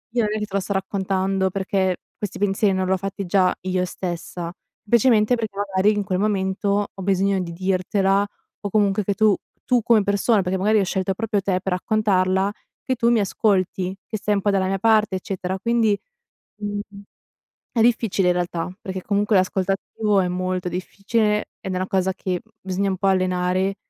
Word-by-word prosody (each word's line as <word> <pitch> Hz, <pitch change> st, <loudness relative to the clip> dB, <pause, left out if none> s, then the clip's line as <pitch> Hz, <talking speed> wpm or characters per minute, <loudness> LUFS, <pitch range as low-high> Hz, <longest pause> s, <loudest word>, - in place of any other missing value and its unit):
io 240 Hz, -, +3 dB
non 210 Hz, -, 0 dB
è -, -, -1 dB
che 210 Hz, -, -2 dB
te 205 Hz, -, -18 dB
lo -, -, +3 dB
sto 200 Hz, -, -3 dB
raccontando 190 Hz, 0 st, 0 dB
perché 190 Hz, -1 st, 0 dB, 0.2 s
questi 205 Hz, -2 st, -5 dB
pensieri 200 Hz, 0 st, +2 dB
non 185 Hz, 0 st, 0 dB
li 185 Hz, -, -1 dB
ho -, -, +2 dB
fatti 195 Hz, +1 st, -4 dB
già 185 Hz, 0 st, +3 dB
io 185 Hz, -1 st, 0 dB
stessa, 175 Hz, -1 st, -5 dB, 0.4 s
semplicemente 235 Hz, 0 st, +4 dB
perché 220 Hz, -4 st, -4 dB
magari 200 Hz, 0 st, +2 dB
in 205 Hz, -, 0 dB
quel 185 Hz, -2 st, -1 dB
momento 200 Hz, 0 st, 0 dB
ho 195 Hz, -, -9 dB
bisogno 195 Hz, 0 st, +2 dB
di 170 Hz, -, -5 dB
dirtela 190 Hz, +2 st, +1 dB, 0.4 s
o 205 Hz, -, -3 dB
comunque 205 Hz, 0 st, +2 dB
che 200 Hz, -, 0 dB
tu 215 Hz, -2 st, +4 dB, 0.3 s
tu 245 Hz, -2 st, +3 dB
come 225 Hz, -2 st, +4 dB
persona, 200 Hz, +1 st, +2 dB
perché 185 Hz, +1 st, -1 dB
magari 210 Hz, +3 st, +3 dB
ho -, -, +3 dB
scelto 190 Hz, +1 st, -1 dB
proprio 210 Hz, 0 st, -1 dB
te 185 Hz, -1 st, 0 dB
per 190 Hz, -2 st, -1 dB
raccontarla 190 Hz, -1 st, +1 dB, 0.3 s
che 260 Hz, -, 0 dB
tu 235 Hz, -1 st, +2 dB
mi 235 Hz, -, +4 dB
ascolti, 190 Hz, -2 st, 0 dB
che 215 Hz, -, -3 dB
sei 210 Hz, 0 st, +1 dB
un 200 Hz, -, 0 dB
po' 205 Hz, -, +2 dB
dalla 190 Hz, -1 st, +1 dB
mia 195 Hz, -, 0 dB
parte, 215 Hz, -2 st, +3 dB
eccetera. 185 Hz, 0 st, -4 dB
Quindi, 230 Hz, -2 st, +2 dB, 0.6 s
mhmm, 205 Hz, -1 st, -3 dB, 0.9 s
è 230 Hz, -, 0 dB
difficile 225 Hz, -5 st, +2 dB
in 180 Hz, -, +3 dB
realtà 175 Hz, 0 st, -2 dB
perché 190 Hz, -1 st, -5 dB
comunque 205 Hz, +1 st, +1 dB
l'ascolto 185 Hz, +1 st, +1 dB
attivo 205 Hz, +1 st, 0 dB
è 180 Hz, -, 0 dB
molto 185 Hz, 0 st, -2 dB
difficile 210 Hz, +4 st, -1 dB
ed 190 Hz, -, -4 dB
è -, -, -2 dB
una 185 Hz, +1 st, -1 dB
cosa 190 Hz, -1 st, +1 dB
che, 180 Hz, -1 st, -3 dB
mhmm, 220 Hz, -, -30 dB
bisogna 190 Hz, +1 st, -1 dB
un 190 Hz, -, -1 dB
po' 195 Hz, -, 0 dB
allenare. 185 Hz, +1 st, +1 dB
195 Hz, 195 wpm, -22 LUFS, 185-210 Hz, 0.9 s, semplicemente